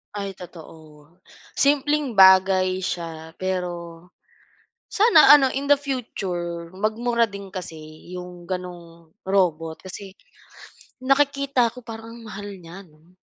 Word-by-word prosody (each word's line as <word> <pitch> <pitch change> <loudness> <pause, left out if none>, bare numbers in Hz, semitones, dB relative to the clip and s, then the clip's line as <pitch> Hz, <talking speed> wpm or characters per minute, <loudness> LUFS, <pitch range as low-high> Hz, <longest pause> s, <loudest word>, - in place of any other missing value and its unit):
Ay 200 -1 -4
totoo. 160 -2 -14 0.4
Simpleng 285 -3 +1
bagay 190 -1 +5
siya 165 -2 -5
pero 175 -2 -5 0.8
sana 440 -8 +7
ano, 270 -3 +1
in 275 +1 -3
the 285 - +6
future 180 -11 -5
magmura 230 +4 0
din 200 -1 -10
kasi 180 -4 -7 0.4
'yong 180 -1 -10
ganung 170 -3 -8 0.2
robot, 165 -4 0
kasi 190 +1 -10 0.9
nakikita 275 -3 +1
ko 250 - -11
parang 225 0 -9
ang 235 - -12
mahal 205 0 -7
niya, 175 +4 -11
'no? 160 +2 -25
190 Hz, 115 wpm, -23 LUFS, 170-235 Hz, 0.9 s, sana